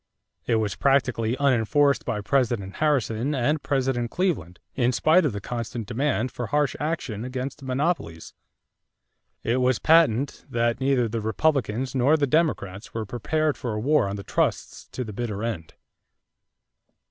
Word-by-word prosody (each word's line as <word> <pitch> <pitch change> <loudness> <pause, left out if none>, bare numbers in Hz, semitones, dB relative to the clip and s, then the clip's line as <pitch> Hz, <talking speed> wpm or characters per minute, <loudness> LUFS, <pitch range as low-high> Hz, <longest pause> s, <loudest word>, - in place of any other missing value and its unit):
It 115 - +2
was 110 -3 0
practically 130 - +1
unenforced 140 +2 +2
by 105 - -2
President 115 -5 0
Harrison 140 -3 +1
and 140 +4 +1
President 130 -3 0
Cleveland, 125 - -1 0.2
in 125 -1 +2
spite 160 +7 +4
of 145 - +1
the 100 - -4
constant 115 +1 -5
demand 130 +1 -1
for 120 - -5
harsh 145 0 +1
action 140 -9 -3
against 130 +3 -5
"monopolies." 130 - -2 1.1
It 120 +2 +1
was 125 -1 +2
patent 145 -5 +3
that 120 0 0
neither 130 -3 +2
the 115 +1 -3
Republicans 125 +1 0
nor 135 +4 +3
the 145 - +2
Democrats 125 - -1
were 110 -1 -2
prepared 150 +8 -1
for 120 -3 -4
a - - -2
war 145 -1 +2
on 100 - -3
the 100 - -6
trusts - - -2
to 130 - -5
the 110 -3 -7
bitter 105 -1 -4
end. 100 -9 -4
125 Hz, 150 wpm, -25 LUFS, 110-140 Hz, 1.1 s, spite